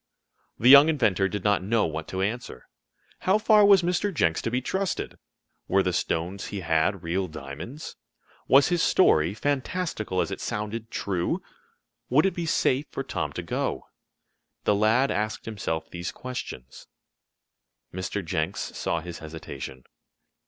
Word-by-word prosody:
The 120 - +2
young 140 +3 +10
inventor 105 - +2
did 100 -1 -4
not 105 -2 +2
know 110 +4 +1
what 80 0 -4
to 95 0 -2
answer. 120 +5 -4 0.5
How 190 +3 +3
far 215 -1 +5
was 200 -3 +6
Mr. 180 +4 0
Jenks 85 - +1
to - - -2
be 125 +2 0
trusted? 190 +9 -3 0.5
Were 95 +1 +3
the 90 - 0
stones 90 +2 -2
he 100 - -5
had 85 +3 +1
real 90 +3 -1
diamonds? 75 - -8 0.5
Was 140 +4 +6
his 175 -1 +1
story, 90 - +4
fantastical 140 - -2
as - - 0
it - - -5
sounded 105 +2 -4
true? 100 - -2 0.7
Would - - +4
it 195 - +2
be 170 -2 -3
safe 140 -2 +1
for - - -4
Tom - - -3
to - - -5
go? - - -2 0.8
The - - +3
lad 110 +6 +3
asked 105 +1 -2
himself 100 -7 -3
these 85 -1 -4
questions. 95 - -8 1.1
Mr. 95 +1 -4
Jenks 80 -1 -2
saw 85 - -1
his 85 0 -8
hesitation. 70 -5 -8
105 Hz, 150 wpm, -26 LUFS, 85-140 Hz, 1.1 s, young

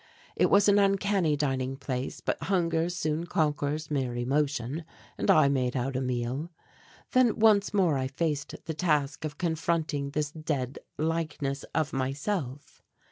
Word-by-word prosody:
It - - +4
was 200 +1 +5
an 205 0 +5
uncanny 195 -5 +2
dining 135 -2 -1
place, 130 -1 -4
but - - -2
hunger 170 -3 +1
soon 165 -1 -2
conquers 150 -1 -1
mere 130 -4 -1
emotion, 140 +3 -1 0.3
and - - -2
I 155 -2 +6
made 130 -2 0
out 130 +2 -2
a 130 - 0
meal. 125 +5 -2 0.6
Then 255 -4 +4
once 215 -2 +4
more 180 -9 +2
I 130 - -1
faced 145 +1 -2
the 160 - -3
task 150 -3 0
of 150 -1 -5
confronting 160 -4 -1
this 150 0 -2
dead 145 -5 -3 0.2
likeness 155 -3 -2
of 155 -2 0
myself. 135 +2 -3
150 Hz, 145 wpm, -28 LUFS, 135-165 Hz, 0.6 s, I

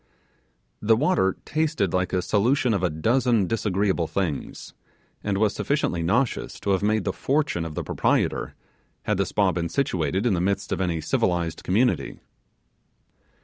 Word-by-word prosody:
The 110 +1 +4
water 125 - +1
tasted 150 - 0
like 90 0 0
a 90 -1 0
solution 120 +3 +2
of 100 - 0
a 90 - +1
dozen 115 +6 +2
disagreeable 100 -4 0
things, 85 -7 -4 0.5
and 100 -2 -1
was 105 0 +2
sufficiently 140 - -1
nauseous 115 +10 0
to 100 - 0
have 95 - +2
made 105 0 +1
the 95 - -1
fortune 140 - 0
of 80 -2 -6
the - - -3
proprietor, - - 0 0.5
had 105 - 0
the 100 -1 0
spa 100 -1 +2
been 85 -1 -2
situated 95 - 0
in 120 - +3
the 85 - 0
midst 100 +2 -1
of - - -1
any 85 -3 -1
civilized 85 +1 -1
community. 115 +7 +1
100 Hz, 155 wpm, -24 LUFS, 90-115 Hz, 0.5 s, The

